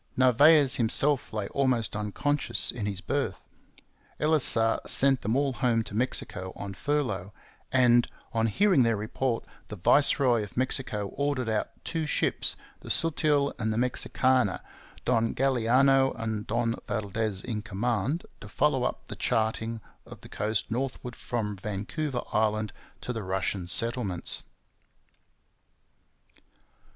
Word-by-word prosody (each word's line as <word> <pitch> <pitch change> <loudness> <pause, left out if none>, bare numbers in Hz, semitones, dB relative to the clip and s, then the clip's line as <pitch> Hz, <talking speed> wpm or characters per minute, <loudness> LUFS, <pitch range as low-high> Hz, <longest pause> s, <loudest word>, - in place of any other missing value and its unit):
Narvaez 135 +2 +5
himself 130 +4 +3
lay 105 -3 -3
almost 125 -7 0
unconscious 120 +7 +1
in 110 -4 -4
his 100 -2 -4
berth. 120 -1 -2 0.8
Elisa 135 -7 +2
sent 135 -1 +3
them 110 +4 -1
all 140 -1 +1
home 115 -1 +1
to 105 - -9
Mexico 95 -5 -2
on 100 -1 -6
furlough; 105 -7 -2 0.4
and, 120 -2 +4 0.3
on 115 0 +1
hearing 190 - +3
their 115 -2 +3
report, 115 +3 -2 0.2
the 105 - -7
viceroy 125 - +4
of 105 +2 -8
Mexico 125 -5 -1
ordered 140 -3 -2
out 110 -1 -1 0.2
two 160 -2 -2
ships, - - 0 0.2
the - - -11
Sutil 150 -3 +2
and 110 -1 -1
the 110 - -2
Mexicana, 125 -3 +1 0.4
Don 115 -2 +1
Galiano 135 +1 +3
and 110 -2 -3
Don 115 +1 0
Valdes 105 -1 -2
in 110 -4 -3
command, 115 - -2
to - - -11
follow - - +1
up - - -3
the - - -8
charting 110 0 -1 0.3
of - - -12
the - - -13
coast 110 +1 -2
northward 125 0 -4
from 110 -4 -3
Vancouver 105 - -4
Island 110 -1 0 0.3
to 125 - -4
the 115 - -4
Russian 95 -1 -2
settlements. 115 -2 +1
115 Hz, 130 wpm, -27 LUFS, 105-135 Hz, 0.8 s, Narvaez